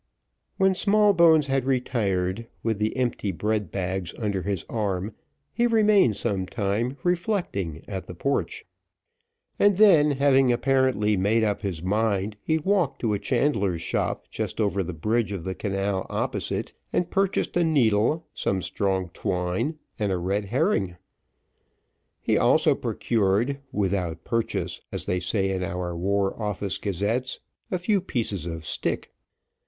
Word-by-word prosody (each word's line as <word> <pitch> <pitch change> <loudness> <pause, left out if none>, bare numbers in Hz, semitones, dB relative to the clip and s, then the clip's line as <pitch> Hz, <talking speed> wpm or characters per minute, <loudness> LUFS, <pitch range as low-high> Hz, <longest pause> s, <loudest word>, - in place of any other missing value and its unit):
When 190 0 +4
Smallbones 185 -6 +5
had 135 -1 0
retired, 115 -6 0 0.2
with 110 -2 0
the 110 +4 -1
empty 120 -5 -1
bread 105 +3 -1
bags 95 -1 -3
under 100 -4 -1
his 95 -2 -3
arm, 100 -2 -2 0.4
he 240 0 +2
remained 210 - +4
some 95 -5 -1
time 115 +6 -1
reflecting 170 - -1
at 95 -2 -5
the 90 - -8
porch, 140 - -2 0.9
and 205 -2 +4
then 175 -8 +6
having 135 -2 +4
apparently 130 -4 +2
made 105 +4 +2
up 105 -2 0
his 90 -6 -4
mind, 105 +1 0
he 160 - +1
walked 180 -2 +1
to 110 -3 +1
a 100 - -1
chandler's 100 - 0
shop - - -1
just - - -4
over 100 -3 +1
the 90 -1 -4
bridge 110 +6 0
of 95 -5 -4
the 95 - -3
canal 100 -1 -2
opposite, - - -2 0.2
and 175 - 0
purchased 195 0 0
a 175 - +3
needle, 140 0 +2
some 95 -2 -1
strong 95 -3 -1
twine, 90 - -2 0.2
and 105 -2 0
a 95 - +1
red 100 +4 -1
herring. 110 - 0 1.2
He - - +1
also - - +4
procured, 115 +5 0
"without 95 -4 -1
purchase," 115 -1 -2
as - - -4
they 90 - 0
say 95 +2 0
in 95 -1 -2
our 90 -2 -3
War 95 +3 0
Office 105 -2 -2
Gazettes, 105 +6 -1 0.3
a 185 - 0
few 195 +2 +1
pieces 105 - -3
of 80 -2 -6
stick. - - -2
105 Hz, 145 wpm, -25 LUFS, 95-140 Hz, 1.2 s, then